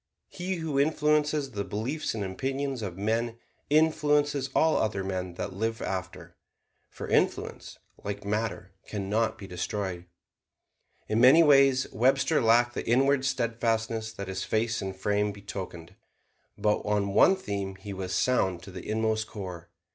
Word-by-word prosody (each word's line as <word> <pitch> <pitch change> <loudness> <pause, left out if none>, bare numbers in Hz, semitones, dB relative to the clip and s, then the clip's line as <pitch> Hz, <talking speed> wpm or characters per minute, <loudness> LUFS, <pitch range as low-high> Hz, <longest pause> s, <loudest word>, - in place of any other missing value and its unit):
He 185 +1 -3
who 160 -5 -2
influences 150 -1 +2
the 100 -3 -3
beliefs 115 +9 -3
and 105 - -2
opinions 135 +6 -3
of 95 -4 -5
men 115 +3 -1 0.3
influences 145 -2 +2
all 160 0 +4
other 105 -3 0
men 95 -2 -4
that 95 - -4
live 110 +3 -2
after. 95 -1 -5 0.5
For - - -8
influence, - - 0 0.3
like 100 0 -5
matter, 105 -2 -2 0.2
can 100 -2 -4
not 110 +1 +1
be 105 - -9
destroyed. 90 -1 -4 1.0
In 110 +2 +1
many 135 +7 +8
ways, 135 -3 +5
Webster 135 +6 +2
lacked 120 +2 +4
the - - -4
inward 135 +2 +3
steadfastness 115 -3 -1
that 100 -2 -6
his 95 0 -3
face 110 +1 0
and 95 -1 -4
frame 105 +2 0
betokened; 95 -4 -8 0.6
but 105 0 +2
on 100 -1 -1
one 190 - +6
theme 100 - -4
he 100 +1 -8
was 95 -1 -5
sound 95 -4 +1
to 95 - -10
the 90 +2 -8
inmost 110 0 0
core. 90 -6 -8
110 Hz, 145 wpm, -28 LUFS, 100-135 Hz, 1.0 s, many